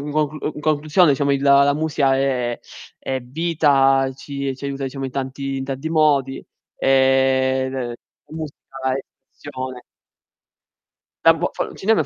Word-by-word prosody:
in 150 +1 -2
conclusione 155 +3 +3
diciamo 140 +1 +1
il 140 0 0
la 140 0 +5
musica 145 -3 +1
è 125 -3 -1 0.4
è 130 0 -3
vita, 135 -1 +2
ci 140 -1 -5
ci 140 - -10
aiuta, 140 0 -3
diciamo 135 +1 -5
in 135 - -4
tanti 135 +1 -4
in 135 - -4
tanti 135 +3 -4
modi, 145 -4 +2 0.4
ehm, 130 0 +3
l 125 -3 -4 0.4
la - - -9
musica 155 -3 -6 0.4
è - - -2 0.3
emozione 130 -3 -8 1.4
Da 165 - +8
bo 170 +2 -2
fo - - -1
il - - -10
cinema 220 +3 +2
è - - +1
135 Hz, 150 wpm, -21 LUFS, 135-150 Hz, 1.4 s, Da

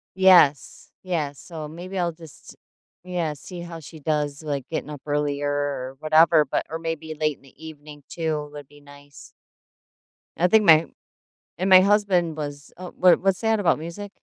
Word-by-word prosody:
Yes, 180 -7 +4
yes. 155 -6 -3
So 160 -3 -8
maybe 180 +4 -8
I'll 175 -2 0
just 160 -2 -15 0.5
yeah, 175 -4 -2
see 175 +5 -10
how 170 -1 -8
she 160 +1 -12
does, 150 0 -2
like, 140 -3 -4
getting 155 -2 -5
up 145 -3 -8
earlier 145 -1 -1
or 140 -2 -3
whatever, 155 0 +5
but 135 - -3
or 160 - -4
maybe 165 -1 -5
late 155 -1 -1
in - - -29
the 135 +3 -16
evening 150 -2 -12
too 155 -3 -3
would 145 -2 -10
be 145 +1 -19
nice. 145 0 -16 1.1
I 180 +2 +2
think 220 +2 +4
my 160 -2 +6 0.7
and 185 +2 -1
my 185 -1 +9
husband 190 -5 +1
was 145 -1 -7
Oh, 180 0 -9
what 180 -1 +5
what's 195 0 0
that 225 -1 +1
about 180 -6 +2
music? 180 +5 -8
160 Hz, 175 wpm, -23 LUFS, 145-175 Hz, 1.1 s, my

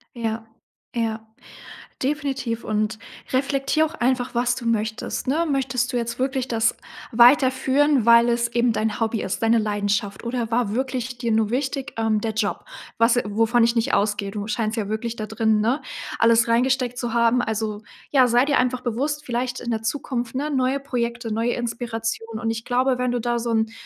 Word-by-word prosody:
Ja, 225 -1 -3 0.5
ja, 225 -2 -2 0.8
definitiv. 270 -5 -2
Und 215 0 -1 0.3
reflektier 275 +3 +1
auch 315 - -9
einfach, 250 0 0
was 240 +1 +2
du 245 - -6
möchtest, 220 -1 -2
ne? 315 +5 +2
Möchtest 255 -3 0
du 245 - 0
jetzt 235 0 -3
wirklich 265 0 -1
das 225 -1 +1 0.4
weiterführen, 260 +2 +4
weil 235 0 +6
es 235 0 +1
eben 240 0 +2
dein 220 0 -1
Hobby 225 -1 0
ist, 190 - -3
deine 225 +1 +4
Leidenschaft? 205 -1 -1
Oder 235 -1 -2
war 230 -3 0
wirklich 255 -1 -3
dir 235 -1 -2
nur 220 -1 +2
wichtig, 270 +2 -2
ähm, 220 -2 +1
der 225 - -1
Job? 220 - -2 0.3
Was 230 +1 +4
wovon 225 +3 +2
ich 235 +1 +1
nicht 235 +4 +1
ausgehe. 205 -1 +1
Du 205 0 -5
scheinst 220 +1 -1
ja 205 -2 -2
wirklich 220 +2 -3
da 215 -2 -5
drin, 220 0 +1
ne, 245 +7 +1 0.4
alles 230 0 +4
reingesteckt 250 +1 +1
zu 240 -2 -3
haben. 235 +1 +3
Also, 215 -1 -3 0.3
ja, 265 -3 +5
sei 245 +2 +3
dir 285 -1 +2
einfach 250 0 +1
bewusst, 285 +6 -2
vielleicht 245 -1 -2
in 240 - -4
der 225 -1 -1
Zukunft 240 0 -3
ne, 290 +4 -2
neue 265 0 +1
Projekte, 235 -3 -3
neue 230 +2 0
Inspiration. 225 -1 -3
Und 225 -1 -1
ich 225 0 -4
glaube 255 +1 +1
wenn 250 0 0
du 245 - -1
da 240 +1 0
so 235 0 -3
'n, 220 -1 +1
235 Hz, 185 wpm, -23 LUFS, 225-255 Hz, 0.8 s, weil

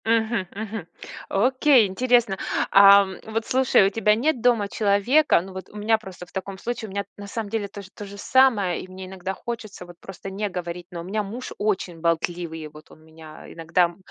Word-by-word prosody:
Мгм 225 -3 +1
мгм. 215 -4 -6 0.4
Окей, 255 +3 +4
интересно. 235 0 +2 0.3
А, 200 0 +8 0.2
вот 225 +1 -3
слушай, 255 -6 +4
у - - +3
тебя 210 0 +3
нет 255 +2 0
дома 230 -4 +3
человека 210 - +3
Ну, 190 +1 -10
вот 190 0 -8
у - - -18
меня 220 +2 +2
просто 190 -4 -10
в - - -23
таком 190 0 -5
случае, 235 +2 -4
у - - -10
меня 200 +1 -3
на 205 0 -9
самом 215 0 -5
деле 215 -1 -2
тож 200 0 -10
тоже 200 -1 -9
самое, 210 -7 +3
и - - -11
мне 185 0 -9
иногда 190 0 -5
хочется 220 -5 -7
вот 175 -1 -14
просто 195 0 -9
не 205 +2 -3
говорить, 175 -1 -6
но 170 -1 -6
у - - -8
меня 205 +5 -2
муж 230 +6 -7
очень 190 -5 -1
болтливый, 165 -1 -2
вот 150 +1 -16
он 155 - -17
меня 160 -1 -13
иногда, 170 +1 +1
200 Hz, 195 wpm, -24 LUFS, 180-225 Hz, 0.4 s, А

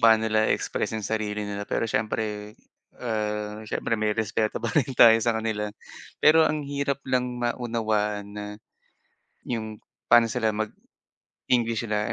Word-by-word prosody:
paano 110 -1 +6
nila 110 0 +2
express 110 - -1
yung 110 - -4
sarili 105 -1 -2
nila 100 0 -5
pero - - 0
syempre 105 -1 -2 0.4
ah, 105 -2 -3
syempre - - -2
may 105 -1 0
respeto 110 0 0
pa 115 0 -2
rin 140 -5 +2
tayo 115 -1 +8
sa 115 0 +1
kanila. 110 -1 -2 0.5
Pero 160 +1 +6
ang 150 -1 -2
hirap 140 -1 -2
lang 125 -1 0
maunawaan 110 -4 -1
na, 105 0 -6 1.0
'yong 110 -3 -4 0.3
paano 115 -1 +6
sila 120 -3 +1 0.8
mag-English 115 -2 -1
sila. 105 0 0
110 Hz, 140 wpm, -26 LUFS, 105-120 Hz, 1.0 s, tayo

